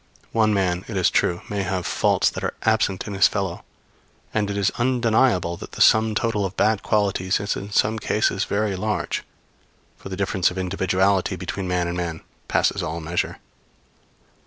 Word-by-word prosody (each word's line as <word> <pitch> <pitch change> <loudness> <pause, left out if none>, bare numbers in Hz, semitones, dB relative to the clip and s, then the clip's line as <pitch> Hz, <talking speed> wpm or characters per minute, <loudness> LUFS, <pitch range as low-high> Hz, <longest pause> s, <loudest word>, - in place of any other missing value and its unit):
One 110 -1 +3
man, 95 -3 0
it 110 - -4
is 90 - +3
true, 85 0 +1
may 100 -1 -2
have 95 -1 -2
faults - - +2
that - - -6
are - - -2
absent 110 -4 +1
in 105 - -5
his 95 -1 +5
fellow; 95 -4 -3 0.7
and 105 -2 0
it 100 - -3
is 100 -1 +2
undeniable 115 -7 +2
that - - -10
the - - -9
sum 110 0 +5
total 115 -3 0
of 95 0 -4
bad 110 -1 +2
qualities 100 -3 +1
is 100 +1 -2
in 100 - -6
some 110 +2 +1
cases 105 -1 0
very 100 -1 -1
large; 105 +3 -2 0.8
for - - -10
the 95 - -5
difference 95 -2 +1
of 90 - -8
individuality 95 +1 +1
between 90 +1 -4
man 90 -1 0
and 85 - -3
man 85 -2 -3 0.3
passes - - +1
all 85 - -3
measure. 85 +2 -2
100 Hz, 180 wpm, -23 LUFS, 90-105 Hz, 0.8 s, his